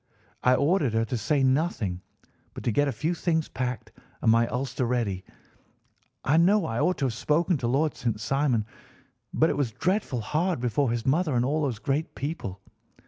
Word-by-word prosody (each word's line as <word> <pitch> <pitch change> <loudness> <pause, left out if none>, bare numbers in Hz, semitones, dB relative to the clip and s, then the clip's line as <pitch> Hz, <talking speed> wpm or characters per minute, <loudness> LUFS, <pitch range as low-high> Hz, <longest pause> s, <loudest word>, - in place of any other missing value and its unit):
I 125 0 +4
ordered 145 - +2
her 115 0 +2
to 120 - -3
say 135 +5 +1
nothing, 130 - 0 0.5
but - - -7
to 120 - +1
get 145 +6 +2
a - - 0
few 150 +9 -1
things 160 -2 0
packed 125 -1 -4 0.3
and 110 - +5
my 115 +1 +4
ulster 130 +2 -2
ready. 110 -7 -1 1.0
I 145 +4 +3
know 195 +5 +4
I 115 +1 -2
ought 180 +5 +2
to 140 - 0
have 125 - -1
spoken 160 - +1
to 120 - -1
Lord 145 +5 +1
St. 115 -3 -2
Simon, 125 -1 +1 0.7
but 160 - +3
it - - -3
was 135 -6 0
dreadful 165 - -1
hard 165 - 0
before 125 +2 +1
his 115 -1 -2
mother 155 +1 +2
and 120 0 +2
all 150 +4 0
those 135 -7 -1
great 140 +6 -2
people. 135 - -5
135 Hz, 190 wpm, -27 LUFS, 115-155 Hz, 1.0 s, and